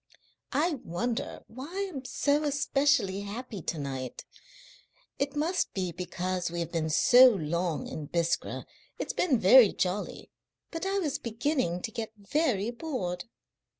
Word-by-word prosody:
"I 310 -1 +1
wonder 235 +9 -3
why 335 - -5
I'm 270 -3 -5
so 290 +3 +1
especially 285 -7 +2
happy 210 0 -6
to 160 - -3
night. 135 -3 -5 0.9
It 280 0 -1
must 330 +5 0
be 185 -3 -1
because 180 +1 -3
we 170 +1 -4
have 170 -1 -3
been 160 -2 -1
so 250 +11 +8
long 170 -4 -1
in 150 -2 -6
Biskra. 170 +1 -1 0.3
It's - - -3
been 300 -8 +2
very 220 +3 +8
jolly, 185 +3 -3 0.4
but 335 +3 -3
I 390 +1 0
was 305 -6 -1
beginning 230 - -1
to 225 - -3
get 220 -2 -5
very 220 -1 0
bored." 235 - -4
225 Hz, 140 wpm, -29 LUFS, 180-285 Hz, 0.9 s, so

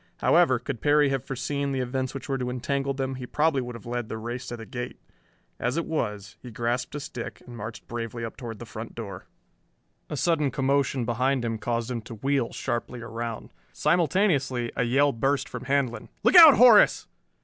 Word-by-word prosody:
However, - - +4
could 115 - -6
Perry 145 -1 +4
have 135 -2 -1
foreseen 140 +2 -2
the 135 - -1
events 130 +1 -2
which 135 - -6
were 135 -2 -1
to 125 0 -2
entangle 135 +2 -2
them, 135 -1 -2
he 130 -1 -7
probably 150 -1 +1
would 125 -1 -6
have 115 - -11
led 120 -2 -4
the 110 - -4
race 120 +3 -5
to 120 - -5
the 115 - -9
gate. 120 +1 -6 0.6
As 125 +5 -1
it 170 - 0
was, 105 -10 -3
he 125 - -9
grasped 120 +4 -2
a - - -3
stick 135 -5 -7
and 120 - -10
marched 110 0 -8
bravely 115 0 -4
up 115 - -7
toward 115 -4 -7
the 120 - -9
front 110 0 -8
door. 100 -5 -7 0.8
A 150 - -4
sudden 155 -2 +2
commotion 135 -1 0
behind 125 +2 0
him 115 -1 -2
caused 115 +2 -2
him 120 -2 -3
to 115 - -9
wheel 135 +1 0
sharply 120 +1 -3
around. 115 0 -6 0.2
Simultaneously 145 - +1
a 125 - +1
yell 140 +4 +3
burst 135 +2 0
from 125 0 -7
Handlon. 135 -3 -1
"Look - - +4
out, 325 -5 +11
Horace!" 235 -4 +6
125 Hz, 195 wpm, -26 LUFS, 115-140 Hz, 0.8 s, out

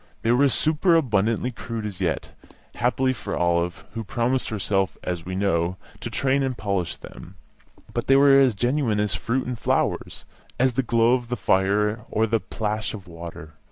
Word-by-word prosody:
They 115 - +3
were 135 +3 +4
superabundantly 130 - +2
crude 115 -2 -6
as 100 -4 -6
yet - - -1 0.4
happily 130 +2 +1
for 125 - -5
Olive, 85 0 0
who 115 - -4
promised 120 +4 0
herself, 95 -3 -1
as 90 -2 -3
we 95 - -3
know, 95 -2 0 0.2
to - - -5
train 135 +4 +1
and 130 -2 -1
polish 100 -5 -1
them 95 - -12 0.6
but - - -2
they 135 - +6
were 140 0 +7
as 130 -5 +4
genuine 120 0 +1
as 105 -2 0
fruit 130 +3 -1
and 125 -2 -4
flowers, - - -1 0.3
as 130 0 +3
the 135 - +1
glow 115 -1 +3
of 125 -2 -1
the 125 - -2
fire 105 +3 +2
or 110 - +2
the 115 0 +1
plash 110 +2 -3
of 95 -4 -11
water. 85 -1 -9
115 Hz, 175 wpm, -24 LUFS, 95-125 Hz, 0.6 s, were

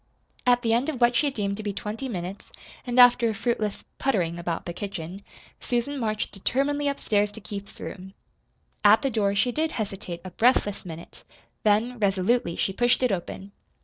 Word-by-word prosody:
At 245 0 +4
the 225 -1 +2
end 245 +6 +2
of 280 -6 -4
what 240 0 +4
she 290 +5 +3
deemed 200 -6 -2
to - - -5
be 205 -1 -3
twenty 215 +6 -5
minutes, 185 -2 -5 0.4
and 245 +1 +1
after 245 -1 +7
a 220 - -2
fruitless 215 -2 -1 0.2
"puttering" 175 -10 0
about 170 -1 -3
the 175 - -4
kitchen, 190 -1 -6 0.4
Susan 250 +4 -2
marched 215 -3 -1
determinedly 280 +8 0
upstairs 210 -7 +1
to 220 - -9
Keith's 200 0 -8
room. 190 0 -8 0.7
At 210 +1 +6
the 270 - +1
door 200 -3 +1
she 220 +5 +2
did 310 +5 -1
hesitate 195 -5 -4
a 185 - -6
breathless 210 -2 +2
minute, 165 0 -10 0.4
then, 220 +4 +2
resolutely, 200 0 +1
she 195 - 0
pushed 245 +4 +2
it 250 - +3
open. 195 +1 -4
215 Hz, 180 wpm, -26 LUFS, 195-245 Hz, 0.7 s, after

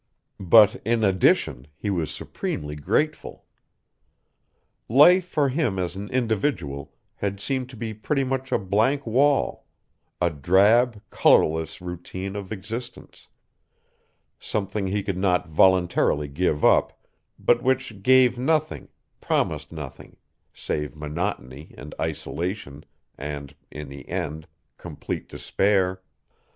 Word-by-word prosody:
But, 105 +5 +5
in 115 +1 +1
addition, 90 - +2
he 100 - -3
was 85 -6 -1
supremely 75 0 -5
grateful. 150 - -2 1.4
Life 170 - +6
for 145 -5 +1
him 130 - 0
as 90 -1 -2
an 100 +1 -6
individual 110 - -1 0.3
had 100 -1 -3
seemed 130 +3 -2
to 130 - -11
be 110 -1 -4
pretty 135 +6 -1
much 130 0 -3
a - - +3
blank 110 +9 +1
wall, 135 +5 +1 0.5
a 85 -1 +1
drab, 105 - +3
colorless 80 +1 +3
routine 90 +2 -6
of 100 -1 -6
existence; 110 +4 -8 1.1
something 100 -1 -3
he 100 +1 -1
could 95 -2 -3
not 90 -3 +1
voluntarily 90 -3 +3
give 75 +1 0
up, - - +3 0.4
but - - +2
which 130 -6 -1
gave 125 +1 +4
nothing, 155 +3 0 0.3
promised - - -1
nothing, 75 -5 -9 0.3
save 75 0 -4
monotony 75 -3 -5
and 70 +4 -9
isolation 80 0 -4 0.3
and, 70 -1 -6 0.2
in 75 0 -8
the 70 0 -11
end, 80 -3 -4 0.3
complete - - -6
despair. 95 -2 0
95 Hz, 115 wpm, -24 LUFS, 80-120 Hz, 1.4 s, Life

